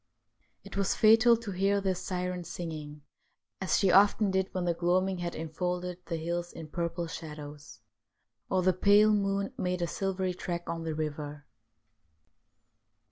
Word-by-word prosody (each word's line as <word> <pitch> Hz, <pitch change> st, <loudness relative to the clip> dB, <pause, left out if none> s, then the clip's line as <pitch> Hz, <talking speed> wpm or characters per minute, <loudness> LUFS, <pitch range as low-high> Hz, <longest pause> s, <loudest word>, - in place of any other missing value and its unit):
It -, -, -10 dB
was 195 Hz, -1 st, +1 dB
fatal 225 Hz, +2 st, +6 dB
to 225 Hz, -3 st, -6 dB
hear 195 Hz, +2 st, +2 dB
this 190 Hz, -2 st, -1 dB
syren 180 Hz, -1 st, -3 dB
singing, 155 Hz, -4 st, -7 dB, 0.6 s
as 190 Hz, -, +2 dB
she 195 Hz, -3 st, +3 dB
often 200 Hz, +2 st, +5 dB
did 190 Hz, 0 st, 0 dB
when 185 Hz, -1 st, -2 dB
the 170 Hz, -, +2 dB
gloaming 180 Hz, +2 st, +1 dB
had 175 Hz, -1 st, -3 dB
en 160 Hz, 0 st, -5 dB
folded 180 Hz, +2 st, -3 dB
the 170 Hz, -, -2 dB
hills 170 Hz, +2 st, -3 dB
in 160 Hz, -2 st, -9 dB
purple 170 Hz, +1 st, -2 dB
shadows; 150 Hz, -6 st, -9 dB, 0.7 s
or 185 Hz, -1 st, +1 dB
the 185 Hz, +1 st, +4 dB
pale 205 Hz, +3 st, +5 dB
moon 200 Hz, +2 st, 0 dB
made 180 Hz, -2 st, -1 dB
a -, -, +2 dB
silvery 190 Hz, +1 st, -2 dB
track 175 Hz, -1 st, -5 dB
on 165 Hz, 0 st, -4 dB
the 160 Hz, -1 st, -2 dB
river. 150 Hz, -1 st, -4 dB
180 Hz, 155 wpm, -30 LUFS, 165-195 Hz, 0.7 s, fatal